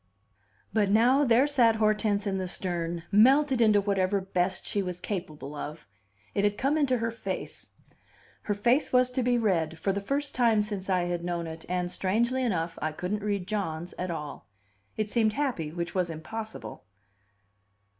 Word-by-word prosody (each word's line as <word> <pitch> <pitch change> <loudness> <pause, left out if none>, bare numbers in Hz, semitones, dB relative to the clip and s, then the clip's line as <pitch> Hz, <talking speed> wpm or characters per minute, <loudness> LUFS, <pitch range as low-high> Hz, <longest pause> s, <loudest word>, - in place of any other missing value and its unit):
But 210 -3 +2
now, 245 +7 +4
there 245 0 +4
sat 245 -6 +4
Hortense 215 -1 +1
in 195 -1 -1
the 185 - -2
stern, 175 -2 -3
melted 260 +5 +5
into 215 -2 +5
whatever 200 -1 +1
best 185 -1 -1
she 205 - -1
was 180 -2 -4
capable 155 -8 -5
of; 150 +1 -7 0.5
it 200 - 0
had 205 0 +1
come 275 +3 +1
into 280 -5 +2
her 230 0 -1
face, 230 - -6 0.8
her 205 - 0
face 240 +8 +2
was 250 0 +4
to 255 - -1
be 245 0 +2
read 170 -8 0
for 195 - 0
the 200 +1 -2
first 280 +7 -2
time 230 -4 +3
since 200 -2 -5
I 185 -2 +2
had 175 -1 -2
known 175 -1 -2
it 160 0 -8
and, 180 -1 -1
strangely 235 +9 0
enough, 170 -9 -1
I 155 0 -1
couldn't 185 +6 -3
read 200 -3 -1
John's 175 -5 -3
at 180 +1 -2
all. 150 -3 -6 0.5
It 215 -1 -2
seemed 220 -3 +2
happy, 245 - -2
which 170 +1 -4
was 180 -2 0
impossible. 215 +8 -7
200 Hz, 175 wpm, -28 LUFS, 175-230 Hz, 0.8 s, melted